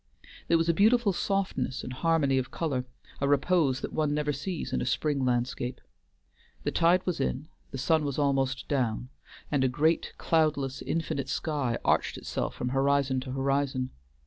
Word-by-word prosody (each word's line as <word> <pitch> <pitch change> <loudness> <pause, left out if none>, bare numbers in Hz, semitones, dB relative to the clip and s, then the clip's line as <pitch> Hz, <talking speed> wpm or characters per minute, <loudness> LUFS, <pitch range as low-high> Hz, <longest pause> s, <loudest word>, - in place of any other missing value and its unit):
There 170 - +4
was 165 0 +1
a 170 - +4
beautiful 215 +2 +4
softness 195 -8 -1
and 125 - -5
harmony 140 -2 +2
of 130 - -4
color, 140 -7 -2 0.3
a 140 - +1
repose 145 -1 +2
that - - -5
one 150 -2 +1
never 150 0 0
sees 170 +5 -4
in - - 0
a - - -1
spring 145 0 0
landscape. 125 0 -1 0.8
The - - 0
tide 175 +2 +3
was 180 -5 -1
in, 135 +3 -2 0.2
the 135 - -6
sun 155 +4 +2
was 140 -2 -2
almost 135 -2 +1
down, 125 -3 -1 0.4
and 140 -3 +2
a - - +4
great, 155 +6 +1
cloudless, 145 -4 +1
infinite 160 -4 -2
sky 140 -7 -1
arched - - +2
itself - - -3
from 125 - -2
horizon 135 0 +2
to 130 0 -6
horizon. 135 -1 0
140 Hz, 170 wpm, -28 LUFS, 130-160 Hz, 0.8 s, There